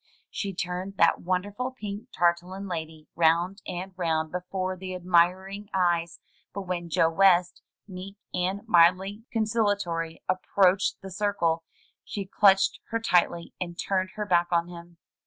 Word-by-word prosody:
She 200 - -3
turned 185 +2 -4
that 170 - +4
wonderful 200 +7 -2
pink 210 -3 -7
tarlatan 175 +3 0
lady 160 -3 -6
round 170 +4 +2
and 185 +2 -5
round 160 -3 -1
before 185 +1 -3
the 185 0 -6
admiring 185 +3 +1
eyes; 170 -2 +1 0.4
but 200 - -3
when 175 -2 -4
Joe 165 +1 +3
West, 180 0 +4 0.3
meek 190 +1 -8 0.2
and 190 +4 -2
mildly 190 +3 +3
conciliatory, 205 -7 -1
approached 185 0 +2
the 190 - -8
circle, 175 -5 0 0.4
she 200 -2 -5
clutched 195 0 +4
her 230 - -1
tightly 175 -5 +1
and 175 -1 -4
turned 190 -1 -1
her 210 -1 -3
back 175 -3 +3
on 170 0 +1
him. 170 -1 -11
185 Hz, 140 wpm, -27 LUFS, 170-195 Hz, 0.4 s, that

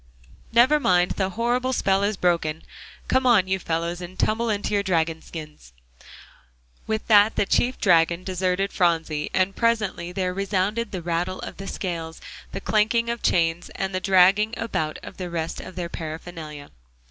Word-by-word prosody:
"Never 250 +6 +5
mind; 180 -8 +3
the 190 -1 -1
horrible 250 +2 +1
spell 195 -5 +2
is 205 0 0
broken; 165 -3 0 0.4
come 260 0 +2
on, 210 -6 +5
you 190 0 0
fellows, 170 +1 -2
and 180 +1 -9
tumble 225 +2 +1
into 205 -1 -1
your 200 - +3
dragon 165 -4 0
skins!" 150 - -10 1.1
With 220 -1 -2
that 210 0 +5
the - - +1
chief 250 +5 +1
dragon 170 -2 +3
deserted 185 +1 -1
Phronsie, 160 -4 0
and 190 +1 +1
presently 215 -7 0
there 180 0 -2
resounded 200 +3 -1
the 185 -3 -5
rattle 175 +2 -1
of - - -7
the 195 - -7
scales, 165 -5 -4 0.3
the - - -4
clanking 230 +2 +1
of 235 - -5
chains, 170 0 +1
and 195 0 -3
the 185 - 0
dragging 195 +4 +4
about 160 -9 -2
of - - -10
the 180 -2 -5
rest 165 -1 -3
of 185 - -10
their 175 -1 -3
paraphernalia. 160 -2 -7
185 Hz, 165 wpm, -24 LUFS, 170-210 Hz, 1.1 s, Never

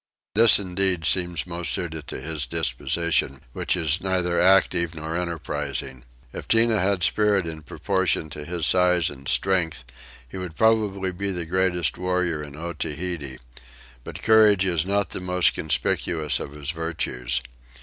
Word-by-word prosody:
This 115 0 +7
indeed 95 -3 0
seems 85 +1 +1
most 85 -1 -2
suited 80 -3 -3
to - - -6
his 80 -3 -4
disposition, 85 -6 -1
which - - -1
is 80 0 0
neither 90 -2 0
active 90 -2 +3
nor 80 +1 -5
enterprising. 75 -6 -4 0.3
If - - -7
Tinah 115 -2 +3
had 95 -1 +1
spirit 105 -1 +2
in 80 -1 -6
proportion 85 0 -1
to 75 - -7
his 85 +1 -3
size 90 -3 +3
and 70 -1 -11
strength 85 -7 +1 0.4
he - - -9
would 90 -3 -6
probably 105 -3 +2
be 100 +2 -3
the 90 -3 -3
greatest 90 -1 0
warrior 90 -3 -1
in 75 -1 -9
Otaheite: 80 -4 -4 0.6
but - - -9
courage 105 -3 +5
is 85 -2 0
not 100 0 0
the - - -4
most 90 -1 +2
conspicuous 80 0 -1
of 70 - -7
his 75 0 -4
virtues. 75 -7 -2
85 Hz, 150 wpm, -24 LUFS, 80-95 Hz, 0.6 s, This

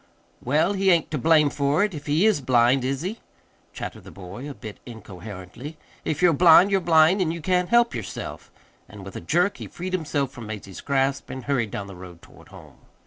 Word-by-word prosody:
"Well, 155 +9 +2
he 195 -1 +1
ain't 170 -3 +2
to 150 - -2
blame 155 0 +4
for 145 +6 +1
it, 210 -2 -1
if 150 -1 -8
he 155 +7 +2
is 215 -9 +3
blind, 125 0 +3
is 135 +3 -2
he?" 205 +6 -4 0.5
chattered - - -7
the - - -12
boy, 100 +9 -9
a 140 - -8
bit 110 -4 -10
incoherently. 110 - -10 0.3
"If 155 +3 -2
you're 175 -2 +6
blind 175 +4 +6
you're 195 -1 +2
blind, 165 +3 +4
and 165 -3 +1
you 170 - -5
can't 180 +2 0
help 235 0 +4
yourself." - - -7 0.4
And 100 -1 -11
with 95 - -10
a - - -6
jerk 175 +6 +1
he - - -8
freed 185 +2 -7
himself 150 -6 -1
from 120 -5 -10
Mazie's 100 -3 -8
grasp 135 0 -1
and 130 - -7
hurried 125 -6 -1
down 100 - -5
the 100 -1 -10
road 90 -1 -12
toward - - -17
home. - - -15
145 Hz, 210 wpm, -24 LUFS, 120-175 Hz, 0.5 s, you're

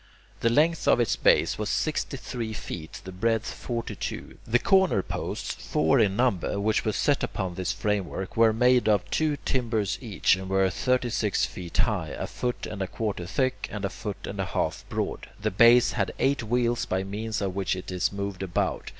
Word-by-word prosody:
The 115 - +2
length 155 +7 +2
of - - +5
its 120 - +2
base - - +3
was 105 -1 -2
sixty 155 -2 -1
three 120 -3 -5
feet, 85 -6 -7
the 95 - -8
breadth 110 +4 0
forty 120 -2 -4
two. - - -6
The 115 +2 +4
corner 190 - +3
posts, - - -4
four 80 +7 +1
in 100 -4 +3
number, 105 -5 +1
which 110 +2 +1
were 110 - +1
set 140 +6 +1
upon 95 -3 -2
this 95 +2 -2
framework, 100 -2 -2
were 115 -1 +5
made 125 +1 +3
of 105 0 +2
two 155 -2 +1
timbers 115 -6 0
each, 110 -7 +2
and 95 0 -7
were 95 0 +3
thirty 125 +4 0
six 105 -5 +1
feet 90 -1 -7
high, 100 -9 0
a - - -3
foot 125 -1 -3
and 100 -2 -6
a 95 - -1
quarter 100 -6 -3
thick, 130 +7 -1
and 105 -2 -3
a 100 - -2
foot 105 -2 -6
and - - -6
a - - 0
half - - -2
broad. - - -3
The 110 +1 -1
base 115 +5 +6
had 95 -5 -1
eight 140 0 +1
wheels 120 +1 0
by 95 +1 0
means 105 +3 -3
of 95 -2 -2
which 95 -1 0
it 90 0 -7
was 90 -1 0
moved 100 -1 -4
about. 95 -3 -1
105 Hz, 200 wpm, -27 LUFS, 95-120 Hz, -, base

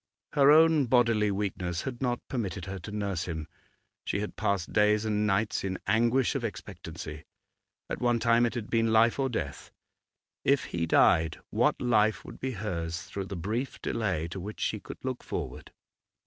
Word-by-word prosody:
Her 140 -1 +5
own 155 -2 +6
bodily 115 -4 +3
weakness 95 -3 -2
had 130 -2 -5
not 120 -2 -1
permitted 95 -9 -3
her 95 0 -5
to 95 +4 -8
nurse 100 -4 -2
him; 80 -3 -4 0.6
she - - -1
had 105 - -4
passed 100 -4 -1
days 105 +1 +3
and 105 -1 +1
nights 105 +2 +1
in 95 -1 -2
anguish 120 +3 +2
of 135 -4 -2
expectancy. 75 -7 -7 0.6
At - - -4
one 120 -1 +3
time 115 +1 +4
it 120 - -5
had 115 -3 -4
been 115 -1 +2
life 115 +3 +4
or 135 -1 +1
death. 70 - -4 0.7
If 140 -1 +3
he 85 -1 -2
died, 80 0 +4
what - - +2
life 110 -3 +2
would - - -10
be 130 0 -3
hers 90 -4 -3
through 100 0 -5
the 100 - -6
brief 110 +10 -3
delay 95 -8 -1
to 95 - -6
which 105 +4 -7
she 110 - -1
could - - -9
look 130 -1 -3
forward? - - -5
105 Hz, 175 wpm, -29 LUFS, 95-120 Hz, 0.7 s, own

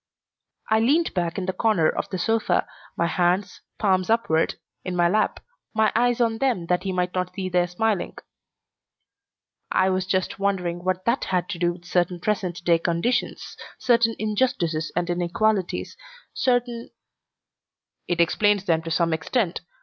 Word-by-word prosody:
I 220 - +5
leaned 295 +9 +2
back 175 -1 -1
in 190 - -2
the 185 - -1
corner 190 -5 +2
of - - -2
the 190 - -3
sofa, 225 +5 +1 0.3
my 170 - +2
hands, 180 +3 0 0.2
palms 185 -2 +1
upward, 220 -8 +2 0.3
in 185 -1 -4
my 175 -1 +4
lap, 215 +5 +1 0.4
my 220 0 +3
eyes 245 +1 +2
on 225 -2 +1
them 240 -10 0
that 180 0 +2
he 190 0 -3
might 180 0 -1
not 180 0 -2
see 190 -2 -3
their 180 -1 +2
smiling. 210 +2 -1 1.5
"I 190 0 +3
was 185 0 -1
just 185 0 -1
wondering 180 -3 -1
what 185 +1 -1
that 235 +3 +1
had 180 -1 0
to 180 -5 -4
do 175 0 +1
with 175 0 -15
certain 180 0 0
present 180 -3 -2
day 170 -1 +4
conditions, 170 +9 -1 0.2
certain 230 -2 +3
injustices 200 -8 0
and 175 0 0
inequalities, 175 +3 0 0.4
certain 245 -2 0 0.6
" - - -59
"It 175 -1 -1
explains 200 +3 +3
them 165 -3 +2
to 165 - -6
some 165 0 +1
extent. 170 +4 -1
185 Hz, 160 wpm, -24 LUFS, 175-220 Hz, 1.5 s, I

